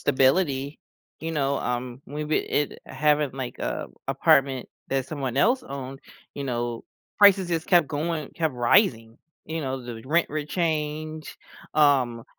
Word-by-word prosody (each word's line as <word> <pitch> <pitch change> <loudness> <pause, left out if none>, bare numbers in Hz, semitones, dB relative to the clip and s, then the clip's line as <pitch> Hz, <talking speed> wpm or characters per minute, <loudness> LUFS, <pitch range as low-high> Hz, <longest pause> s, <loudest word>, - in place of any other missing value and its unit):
stability, 140 +1 +2 0.4
you 165 +1 -3
know, 140 -2 0
um, 125 +1 -3
we 150 +2 -4
we 155 +1 +1
it 145 - -1
having 150 -2 +1
like, 130 -2 -6
uh, - - -3 0.2
apartment 135 -2 +3 0.2
that 135 -1 -1
someone 135 -4 -4
else 245 - +3
owned, 135 - -7 0.3
you 140 - -4
know, 120 -2 -3 0.3
prices 195 -3 +6
just 165 -1 -1
kept 175 -5 +5
going, 155 0 -2
kept 160 -5 -1
rising, 120 - +2 0.3
you 160 +1 -3
know, 135 -2 -3
the 120 -2 -8
rent 165 +5 +2
would 150 0 -3
change, 155 -2 -2 0.4
um, 130 -6 +3
145 Hz, 145 wpm, -25 LUFS, 130-155 Hz, 0.4 s, prices